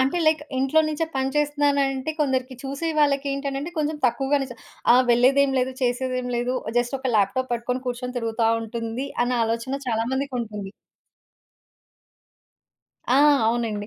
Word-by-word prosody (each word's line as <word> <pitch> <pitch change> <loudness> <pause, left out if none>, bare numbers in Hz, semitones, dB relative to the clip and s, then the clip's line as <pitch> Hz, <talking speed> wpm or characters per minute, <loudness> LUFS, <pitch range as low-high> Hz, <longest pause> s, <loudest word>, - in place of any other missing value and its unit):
అంటే, 265 +6 +1
లైక్ 310 -1 +4 0.2
ఇంట్లో 270 +4 +3
నుంచే 310 +1 -1
పని 265 0 +1
చేస్తున్నానంటే 285 -1 +1
కొందరికి 260 -2 0
చూసే 280 +5 -3
వాళ్ళకి 285 -1 +2
ఏంటనంటే 275 +2 -3
కొంచెం 305 0 0
తక్కువగానే 270 +3 0
చూస 245 - -9 0.4
"ఆ - - +7
వెళ్ళలేదేమి 265 +3 +4
లేదు 255 +1 0
చేసేది 255 +1 0
ఏమి 250 0 -4
లేదు 245 +2 -1 0.2
జస్ట్ 240 +3 -1
ఒక 260 -2 -2
ల్యాప్‌టాప్ 250 +6 +1
పట్టుకొని 250 +2 -2
కూర్చొని 250 +1 -4
తిరుగుతా 225 0 0
ఉంటుంది." 230 +3 -4 0.2
అన్న 250 - -1
ఆలోచన 230 +4 -2
చాలా 225 -1 0
మందికుంటుంది. 235 -7 -3 2.4
ఆ! - - +5 0.3
అవునండి. 225 -3 -1
260 Hz, 140 wpm, -24 LUFS, 240-275 Hz, 2.4 s, ఆ